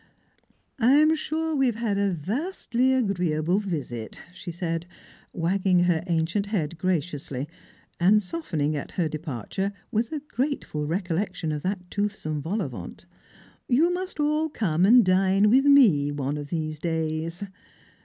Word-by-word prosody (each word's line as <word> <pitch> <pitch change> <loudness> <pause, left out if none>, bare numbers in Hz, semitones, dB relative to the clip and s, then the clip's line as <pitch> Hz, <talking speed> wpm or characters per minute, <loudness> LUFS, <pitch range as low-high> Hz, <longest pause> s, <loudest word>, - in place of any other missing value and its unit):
" - - -36 0.3
I 245 +3 +5
am 305 +2 +6
sure 320 0 -2
we 270 -2 +3
have 235 - 0
had 215 -3 -1
a 200 0 +2
vastly 245 - -1
agreeable 180 -7 +1
visit," 145 - -5
she 180 -1 -7
said, 165 0 -3 0.5
cvagging 180 +1 +2
her 170 -2 +1
ancient 175 +4 0
head 170 -6 -2
graciously, 150 -6 -2 0.5
and 205 +4 +4
softening 160 - -2
at 145 - -5
her 175 -3 0
de 155 0 -4
parture 155 - -3 0.2
with 230 0 0
a 310 - -2
grateful 255 - -2
recollection 175 -1 -2
of 150 -1 -3
that 185 0 -4
toothsome 200 -8 -2
vol 195 +8 -2
au 140 - -4
vent; 95 -8 -9 0.6
"you 320 +8 +4
must 365 -2 -5
all 305 +2 +1
come 185 - +1
and 240 0 +7
dine 190 +2 +3
with 265 +3 +5
me 210 - +6
one 145 0 -2
of 145 -1 -6
these 155 -2 -3
days." 160 +2 -2
185 Hz, 155 wpm, -26 LUFS, 155-230 Hz, 0.6 s, and